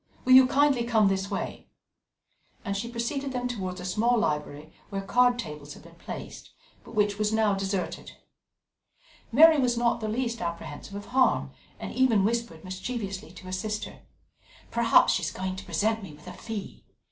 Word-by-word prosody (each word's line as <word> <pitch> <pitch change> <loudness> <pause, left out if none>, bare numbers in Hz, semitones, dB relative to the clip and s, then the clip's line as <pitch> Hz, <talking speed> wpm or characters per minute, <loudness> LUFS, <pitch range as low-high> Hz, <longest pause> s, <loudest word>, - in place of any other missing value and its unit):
Will 255 - +5
you 260 0 +9
kindly 275 -2 +3
come 220 -4 +3
this 195 0 -1
way?" 200 - -5 1.0
And 200 - -2
she 225 +4 -3
preceded 260 +4 -3
them 250 0 -1
towards 190 -6 -4
a 180 - -7
small 225 +6 +2
library, 150 -5 -2 0.2
where 195 -1 -4
card 245 +4 +3
tables 150 -9 -7
had - - -15
been 170 0 -15
placed, 170 - -9 0.3
but - - -12
which 205 -1 +1
was 210 0 +1
now 220 -2 +2
deserted. 195 -1 -3 1.2
Mary 310 +4 +7
was 245 -3 +2
not 235 0 +2
the 215 - -2
least 235 0 -2
apprehensive 170 +2 -6
of 205 - -6
harm, 260 -1 +3 0.3
and - - -6
even 230 -7 +3
whispered 230 -8 -2
mischievously 190 -1 -5
to 185 - -12
her 185 - -7
sister: 210 +3 -4 0.7
"Perhaps 235 -1 +5
she - - 0
is 160 - -1
going 185 +1 -4
to 190 - -8
present 220 +1 0
me 190 -6 -9
with 150 +1 -16
a 180 - -8
fee!" 215 0 -7
210 Hz, 175 wpm, -27 LUFS, 185-240 Hz, 1.2 s, you